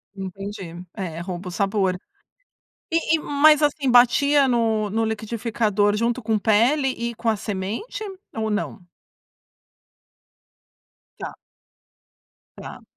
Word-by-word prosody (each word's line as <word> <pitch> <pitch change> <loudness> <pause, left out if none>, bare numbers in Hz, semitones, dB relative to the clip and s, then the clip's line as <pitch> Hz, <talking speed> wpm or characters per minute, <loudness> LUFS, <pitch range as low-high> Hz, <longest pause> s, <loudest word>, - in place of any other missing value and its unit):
Entendi. 190 -2 -7
É, 175 -5 -5
rouba 180 +1 -6
o - - -7
sabor. 195 -1 0 0.9
E 330 -1 +2
e - - -4
mas, 300 +1 +4
assim, 290 -2 +1
batia 270 +4 +5
no 225 -4 +1
no 225 +2 0
liquidificador 220 -2 0
junto 235 +3 0
com 220 -1 +1
pele 235 +7 +3
e 235 -2 -3
com 230 - -3
a 220 - +3
semente 210 - -4 0.3
ou 220 -1 -2
não? 205 -3 -3 2.3
Tá. - - -6 1.2
Tá. - - -10
220 Hz, 110 wpm, -23 LUFS, 200-250 Hz, 2.3 s, batia